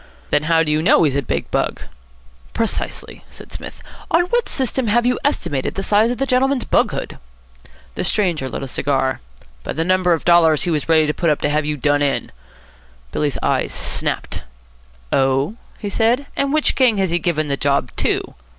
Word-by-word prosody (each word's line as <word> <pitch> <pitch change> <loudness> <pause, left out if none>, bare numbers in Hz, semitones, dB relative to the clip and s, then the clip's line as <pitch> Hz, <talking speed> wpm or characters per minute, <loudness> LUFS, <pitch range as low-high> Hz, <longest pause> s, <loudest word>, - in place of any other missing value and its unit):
"Then 150 - +2
how 165 -1 +4
do 150 - -1
you 155 +1 +2
know 170 +1 +4
he's 145 -4 +1
a 140 - +1
big 125 - -3
bug?" - - -1 0.7
"Precisely," 225 -2 -2
said - - -13
Psmith. - - -8 0.3
"On 340 - +4
what 475 +7 0
system 260 -2 -1
have 235 +3 +2
you 250 0 +1
estimated 170 - -1
the 195 - -3
size 210 +3 +3
of 245 - -2
the 270 - 0
gentleman's 265 0 +1
bughood?" - - 0 0.7
The - - -3
stranger 170 -10 0
lit - - -5
a - - -4
cigar. 135 0 0 0.4
"By - - -4
the 165 - -1
number 185 -1 +3
of 165 - -3
dollars 165 -3 +5
he 175 - 0
was 155 0 -2
ready 160 -1 +5
to 150 - 0
put 170 0 0
up 150 - +1
to 145 - +1
have 150 0 0
you 150 0 -2
done 145 +2 +1
in." 140 -1 -1 0.8
Billy's 145 -2 -1
eyes - - 0
snapped. - - -2 0.7
"Oh?" 135 +6 +2 0.2
he 210 - -6
said. 230 +6 +1
"And 280 0 0
which 305 0 +2
gang 250 -5 +3
has 190 -3 0
he 175 - +1
given 155 -3 -1
the 140 - 0
job 140 -3 0
to?" - - -1
170 Hz, 195 wpm, -19 LUFS, 145-230 Hz, 0.8 s, dollars